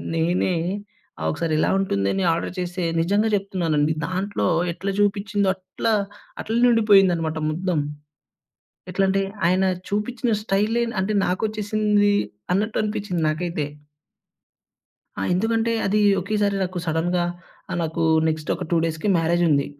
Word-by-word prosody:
నేనే, 175 +2 +1 0.7
ఆ! - - -4
ఒకసారి 160 +1 -2
ఇలా - - +2
ఉంటుందని 100 - 0
ఆర్డర్ 165 - -2
చేస్తే, 180 0 -3 0.2
నిజంగా 205 +6 +2
చెప్తున్నాను 185 -6 -1
అండి 150 +2 +2
దాంట్లో 190 +3 -2 0.3
ఎట్లా 195 +3 -4
చూపించిందో 205 0 +1
అట్లా 190 +4 -2 0.5
అట్లానే 235 +3 +2
ఉండిపోయిందన్నమాట 190 -8 +4
మొత్తం. 170 0 -1 1.1
ఎట్లంటే 195 +1 +1 0.3
ఆయన 185 +2 +3 0.2
చూపిచిన 230 +4 -1
స్టైలే 215 +3 +1 0.2
అంటే 195 +3 -1
నాకొచ్చేసింది 210 +1 +1 0.4
అన్నట్టు 210 +3 0
అనిపించింది 205 -5 -2
నాకైతే. 160 0 -2 1.5
ఆ! - - -1
ఎందుకంటే, 225 +3 +1
అదీ 210 +2 +2 0.2
ఒకేసారి 200 0 0
నాకు 180 0 -4
సడన్‌గా 175 +2 0 0.5
ఆహ్, - - -2
నాకూ 165 +1 -1 0.2
నెక్స్టొక 155 -1 -2
2 170 - +2
డేస్‌కి 160 +5 -2
మ్యారేజుంది. 165 -3 +2
190 Hz, 115 wpm, -23 LUFS, 170-210 Hz, 1.5 s, ఉండిపోయిందన్నమాట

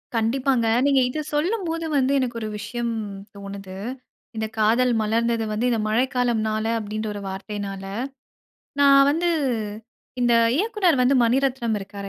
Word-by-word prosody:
கண்டிப்பாங்க. 240 +1 +1 0.2
நீங்க 275 -2 +4
இத 310 - -4
சொல்லும்போது 330 0 -1
வந்து 265 0 +2
எனக்கு 245 -2 -2
ஒரு 215 - -3
விஷயம் 235 +2 -3 0.4
தோனுது, 195 -1 -8 0.6
இந்த 220 0 -2
காதல் 235 +4 +3
மலர்ந்தது 230 +1 +1
வந்து 220 +4 -1
இந்த 230 -2 +1
மழைக்காலம்னால 225 -2 0
அப்படின்ற 215 +1 -4
ஒரு 205 - -6
வார்த்தையினால. 195 0 -5 1.0
நான் 275 0 +7
வந்து 340 +3 +1 0.9
இந்த 240 -1 +3 0.2
இயக்குனர் 375 - +2
வந்து 265 +2 +4
மணிரத்னம் 250 -2 +1
இருக்கிறாரு 200 0 -8
235 Hz, 125 wpm, -23 LUFS, 215-270 Hz, 1.0 s, நான்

